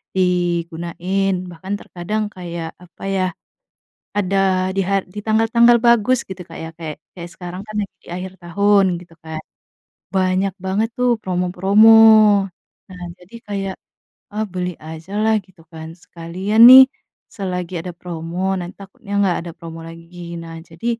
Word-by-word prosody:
digunain. 175 +1 -1 0.2
Bahkan 185 +4 -6
terkadang 210 +5 -4
kayak 170 -2 -6
apa 175 0 -16
ya, 190 -1 +1 0.9
ada 190 -1 +1
di 195 - 0
har 195 +1 +1
di 205 +3 -9
tanggal-tanggal 225 +2 +4
bagus 235 +1 +3
gitu 190 -1 -8
Kak 165 - -10
ya, 160 - -6
kayak 155 -3 -6 0.2
kayak 175 -1 -9
sekarang 180 +1 -8
kan 215 - -9
lagi 200 - -7
di - - -21
akhir 185 +1 -6
tahun 195 +1 +2
gitu 170 -2 -16
kan, 160 0 -7 0.8
banyak 185 0 +1
banget 200 +4 -1
tuh 250 -2 +2
promo-promo. 190 +4 +3 1.0
Nah 180 -1 -10 0.2
jadi 180 +6 -15
kayak 195 -2 -3 0.6
ah 215 - -1
beli 180 -1 -4
ajalah 190 +8 -2
gitu 180 -2 -22
kan, 160 0 -8
sekalian 180 +6 -3
nih 260 +1 +12 0.5
selagi 180 -2 -4
ada 180 - -6
promo 175 +2 -3
nanti 175 0 -6
takutnya 200 +1 -12
gak 175 - +1
ada 170 - -6
promo 165 0 -9
lagi. 170 +1 -9
Nah 165 0 -9
jadi 170 +6 -10
185 Hz, 145 wpm, -19 LUFS, 170-195 Hz, 1.0 s, nih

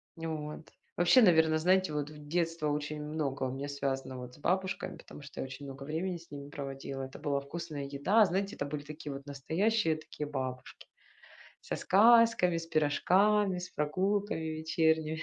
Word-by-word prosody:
Нь 165 - -7
вот. 155 0 -5 0.3
Вообще, 175 +9 +6
наверно, 160 -6 +5
знаете 185 0 +3
вот, 150 -1 -2
в 150 -1 -12
детство 165 -1 0
очень 150 +1 -2
много 150 -3 -2
у 130 - -1
меня, 135 +2 -4
вот, - - -5
связано 135 -2 -3
с - - -16
бабушками, 190 +5 -1
потому - - -12
что 140 -1 -11
я - - -2
очень 135 +2 -8
много 135 0 -8
времени 165 +5 -2
с 170 -2 -17
ними 140 -1 -8
проводила. 135 -1 -6
Это 130 0 -8
была 145 -2 0
вкусная 145 0 -6
еда. 145 +11 +3
Знаете, 195 +3 -1
это - - -3
были 145 0 -4
такие 150 -1 -7
вот 135 0 -8
настоящие, 160 +6 +1
такие, 150 -1 -7
бабушки 130 -3 -5 0.8
со - - -3
сказками, 225 -3 +5
с 165 0 -4
пирожками, 185 +6 +3
с 180 0 -6
прогулками 190 +5 0
вечерними, 160 0 0
155 Hz, 175 wpm, -31 LUFS, 140-180 Hz, 0.8 s, Вообще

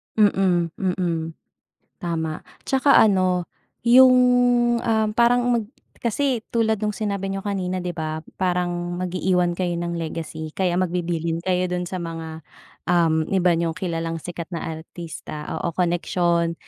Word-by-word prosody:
Mm. 190 -5 +3
Mm. 170 -3 -1 0.7
Tama 160 -2 -3 0.2
'tsaka 270 +1 +5
ano, 185 -4 +3 0.4
yung, 255 +2 +8 0.7
ah, 220 -2 +2
parang 240 +1 +4
mag 235 -3 +1 0.4
kasi 260 +3 +1 0.2
tulad 220 -2 +2
nung 210 0 -2
sinabi 200 -2 -2
niyo 195 - -3
kanina, 185 -2 -2
'di 180 - -3
ba? 155 -1 -3 0.2
parang 175 -1 -1
mag-iiwan 180 -1 0
kayo 180 -2 0
ng 170 0 -3
legacy 160 -1 -5
kaya 180 -2 0
magbibilin 170 -2 -1
kayo 180 0 +1
dun 180 0 -2
sa 185 - -3
mga, 165 -2 -6 0.4
uhm, 165 -3 +2
iba 180 -1 +3
niyong 165 -1 0
kilalang 165 -2 -3
sikat 170 0 -6
na 165 - -3 0.2
artista, 160 -2 -8
oo 170 - -2
koneksyon. 170 -1 +1
180 Hz, 135 wpm, -23 LUFS, 165-195 Hz, 0.7 s, yung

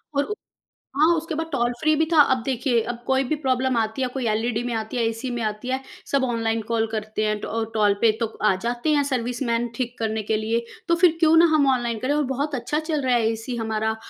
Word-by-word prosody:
और 280 - +3
उ 420 - -4 0.6
हाँ, 310 - +5
उसके 325 0 -3
बाद 325 +1 -2
टोल 240 -3 +1
फ्री 310 0 +3
भी 320 +1 +2
था, 310 - +8
अब 260 -3 +3
देखिए, 250 -2 +1
अब 240 - -8
कोई 265 0 +2
भी 270 +4 -1
प्रॉब्लम 260 -1 +1
आती 220 +3 -1
है, 255 - +1
कोई 260 -2 -2
एलईडी 225 +2 0
में 245 -1 -3
आती 220 +2 -4
है, 235 - +1
एसी 225 +3 -5
में 240 -1 -3
आती 215 +2 -3
है, 260 +1 0 0.3
सब 275 -1 +2
ऑनलाइन 230 -2 0
कॉल 225 -1 +1
करते 215 -1 -2
हैं, 215 0 0
ट - - -4 0.3
टोल 210 -2 +3
पे, 230 - +5
तो 230 - +1 0.2
आ - - +4
जाते 240 +5 -1
हैं 290 - +3
सर्विसमैन 240 -1 -1
ठीक 245 0 -3
करने 220 -1 -1
के 215 +1 0
लिए। 225 +2 -1 0.2
तो 335 - +3
फिर 340 -1 +4
क्योँ 325 -1 +5
ना 335 - +7
हम 285 -2 +3
ऑनलाइन 240 -3 -2
करें, 255 +5 0
और 300 - +2
बहुत 285 +2 -2
अच्छा 255 +5 -1
चल 315 -2 -2
रहा 250 -1 +3
है, 230 -2 +2
एसी 225 +2 -5
हमारा 220 -1 -1
240 Hz, 245 wpm, -23 LUFS, 225-275 Hz, 0.6 s, था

